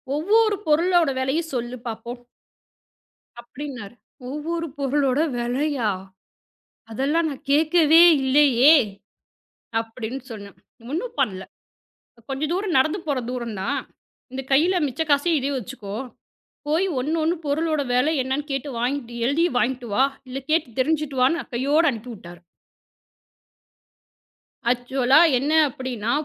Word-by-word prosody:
ஒவ்வொரு 420 +7 +3
பொருளோட 335 +1 +3
விலையும் 310 +6 -1
சொல்லு 240 0 -3
பாப்போம்! 235 +2 -6 1.2
அப்படின்னாரு. 250 -4 -8 0.3
ஒவ்வொரு 330 +4 -3
பொருளோட 275 -1 +1 0.2
விலையா? 245 -1 -1 1.0
அதெல்லாம் 285 +8 0
நான் 275 -1 -9
கேக்கவே 315 +1 +5 0.2
இல்லையே! 270 +1 +5 1.1
அப்படின்னு 225 +3 -6
சொன்னேன். 200 -4 -9 0.4
ஒண்ணும் 460 +10 -4
பண்ணல. 190 -8 -1 0.9
கொஞ்ச 270 +2 -4
தூரம் 370 -2 0
நடந்து 310 +8 +2
போற 285 -3 0
தூரம் 235 -4 -4
தான். - - -1 0.5
இந்த 265 +1 -4
கையில 335 +7 +4
மிச்ச 270 +3 -3
காசையும், 295 +3 +3
இதையும் 275 +1 -2
வச்சுக்கோ. 210 -4 -8 0.7
போய் 325 +6 +1
ஒண்ணு 295 +6 -1
ஒண்ணு 330 +3 +1
பொருளோட 310 +1 0
விலை 255 +6 +2
என்னன்னு 275 +3 -3
கேட்டு 275 +1 -3
வாங்கிட்டு 245 0 -2
எழுதி 305 +6 +2
வாங்கிட்டு 245 -1 -1
வா! 260 - +4 0.3
இல்ல 260 +2 -4
கேட்டு 305 -8 0
தெரிஞ்சிட்டு 300 0 0
வான்னு 300 +7 +2
அ - - -24
கையோட 285 +6 +2
அனுப்பி 240 +1 -8
விட்டாரு. 175 -4 -12 2.3
ஆக்சுவலா 255 +3 +3 0.2
என்ன 285 +5 -1 0.2
அப்படின்னா, 245 -4 -4
270 Hz, 115 wpm, -23 LUFS, 245-310 Hz, 2.3 s, கேக்கவே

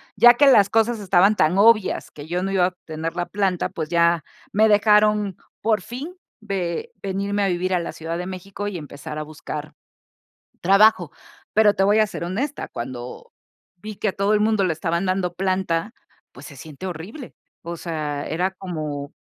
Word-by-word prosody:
ya 240 0 +8
que 285 +4 +4
las 205 -7 +6
cosas 225 0 +2
estaban 195 +1 +4
tan 175 +1 +2
obvias 215 -2 +4
que 145 - -11
yo 175 +3 -2
no 195 - -2
iba 190 -2 +3
a - - +3
obtener 165 -2 -6
la 175 -1 -2
planta, 195 -3 -1
pues 155 -2 -5
ya 170 -1 +3 0.3
me 215 +2 +4
dejaron 210 -2 +3 0.2
por 215 -2 +1
fin 275 - -7 0.3
ve 195 - -3
venirme 200 +1 -1
a - - +2
vivir 185 +1 0
a - - +1
la 170 - -4
Ciudad 165 +1 -5
de 180 - -4
México 190 +2 -6
y 200 -3 -4
empezar 150 +1 -8
a - - -3
buscar 150 0 -7 0.9
trabajo. 195 -3 +5 0.4
Pero 210 -1 +5
te - - +1
voy 205 +2 +4
a 215 - +4
ser 170 - -6
honesta, 250 +12 -3
cuando 120 +1 -7 0.5
vi 210 +3 -9
que 215 - -1
a 190 - -1
todo 200 +1 +1
el 210 - +3
mundo 215 -2 +2
le 180 - +1
estaban 170 +3 -1
dando 185 -2 -1
planta, 185 +1 -1 0.4
pues 130 +4 -12
se 140 - -12
siente 155 +6 -9
horrible. 185 - -8 0.3
O 170 +1 -6
sea, 155 -4 -4
era 180 +4 -1
como 155 -6 -5
185 Hz, 185 wpm, -22 LUFS, 165-210 Hz, 0.9 s, ya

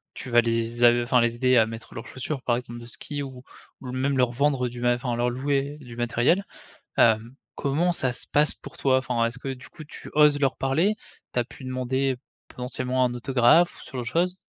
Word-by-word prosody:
tu - - -6
vas 120 0 +5
les 115 +1 -1
a 120 - +9
enfin 125 0 +3
les 115 0 +1
aider 130 +1 +3
à 110 - +6
mettre 115 0 -9
leurs 115 - -6
chaussures, 130 +2 -4
par 120 -2 +1
exemple 120 -1 -7
de - - -10
ski. 145 +4 -6
Ou 130 -2 -9 0.4
ou 125 - -6
même 135 +1 0
leur 125 -2 +3
vendre 135 0 +1
du 120 0 -8
mat 120 0 +3
enfin 120 0 -3
leur 120 +1 +1
louer 140 +3 -1
du 125 -5 -11
matériel. 120 +10 +2 0.5
Hem 115 +2 +3 0.2
comment 155 +6 +1
ça 130 -7 +1
se - - -3
passe 150 +1 +2
pour - - -13
toi? 130 -1 +3
Enfin, 120 -2 0
est-ce 115 +2 -4
que 135 - -6
du 130 -2 -11
coup 155 - -11
tu - - -10
oses 150 -1 +5
leur 135 -2 +1
parler, 155 +10 +2 0.4
tu - - 0
as 120 - +2
pu 130 - -13
demander, 130 +1 -1 0.3
potentiellement 125 0 -2
un 125 - 0
autographe, 130 +7 +4
ou - - -14
ce - - -13
genre 130 - -3
de - - -8
chose? 180 +7 0
125 Hz, 225 wpm, -25 LUFS, 120-140 Hz, 0.5 s, a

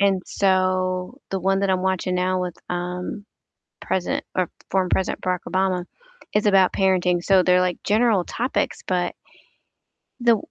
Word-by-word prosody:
and 195 -2 +2
so 185 +3 0
the 190 -1 -2
one 195 +1 +1
that 200 -1 +1
I'm 185 0 +1
watching 185 -1 0
now 185 0 +1
with, 180 -2 -4
um, 180 +3 -4 0.6
President 185 -2 -1
or 185 -2 0 0.2
former 185 -1 +1
President 190 - 0
Barack 180 -1 0
Obama 185 -1 0 0.5
is 210 0 +2
about 195 -2 +5
parenting. 180 -2 +2
So 190 -2 +5
they're 180 0 +4
like 180 -1 -1
general 210 -3 +3
topics, 250 +3 -2
but 180 -1 0 1.1
the 235 -2 +5
185 Hz, 150 wpm, -23 LUFS, 180-195 Hz, 1.1 s, about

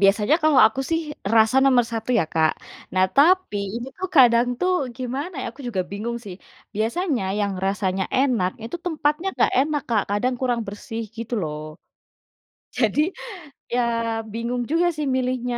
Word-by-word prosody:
biasanya 205 +6 +4
kalau 310 -3 +4
aku 270 +4 -2
sih 330 0 +2 0.4
rasa 220 +3 +5
nomor 255 -3 +5
1 225 +2 -3
ya 195 - +2
Kak, 160 -1 +3 0.4
nah, 185 0 +4
tapi 350 - +4 0.2
ini 240 +1 -5
tuh 375 - -3
kadang 240 -2 +6
tuh 365 0 +2 0.2
gimana 270 +7 -4
ya - - -4
aku 260 - -16
juga 195 -6 -1
bingung 220 +4 -4
sih, 195 -3 -7 0.4
biasanya 240 - -1 0.2
yang 200 -1 0
rasanya 195 -1 0
enak 245 -9 +2
itu 230 +9 -5
tempatnya 310 0 0
nggak - - +3
enak 295 0 0
Kak 215 -3 +3
kadang 245 +5 0
kurang 245 -2 0
bersih 210 +3 -6
gitu 230 +1 -4
loh. 150 -1 -4 1.2
Jadi, 240 +3 +1 0.7
ya 245 - +2 0.5
bingung 235 +2 -2
juga 340 +2 +3
sih 300 - -1
milihnya. 250 -1 -1
240 Hz, 160 wpm, -23 LUFS, 210-280 Hz, 1.2 s, kadang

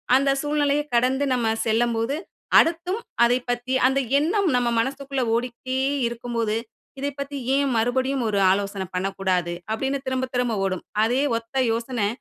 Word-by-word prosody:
அந்த 275 +1 +3
சூழ்நிலையை 295 -1 +1
கடந்து 260 +4 +2
நம்ம 235 -3 +1
சொல்லம்போது, 230 +3 +1 0.4
அடுத்தும் 345 +5 +1 0.2
அதை 245 +1 +4
பற்றி 245 +2 -1
அந்த 270 +1 +1 0.2
எண்ணம் 370 +6 +1
நம்ம 245 -1 +2
மனசுக்குள்ள 275 +2 -2
ஓடிக்கிட்டே 250 +2 -3 0.3
இருக்கும்போது, 235 -2 -2 0.4
இதைப் 280 0 -3
பத்தி 280 0 -4 0.2
ஏன் 280 0 +2
மறுபடியும் 260 +3 0
ஒரு 200 -2 +1
ஆலோசனை 195 0 -1
பண்ணக்கூடாது 185 -2 -1 0.2
அப்படின்னு 270 +5 -1
திரும்ப 260 0 0
திரும்ப 245 -3 +1
ஓடும். 185 -2 -2 0.2
அதே 245 +4 +2 0.2
ஒத்த 230 +3 -11 0.2
யோசனை, 230 -2 -1
245 Hz, 140 wpm, -24 LUFS, 225-275 Hz, 0.4 s, அதை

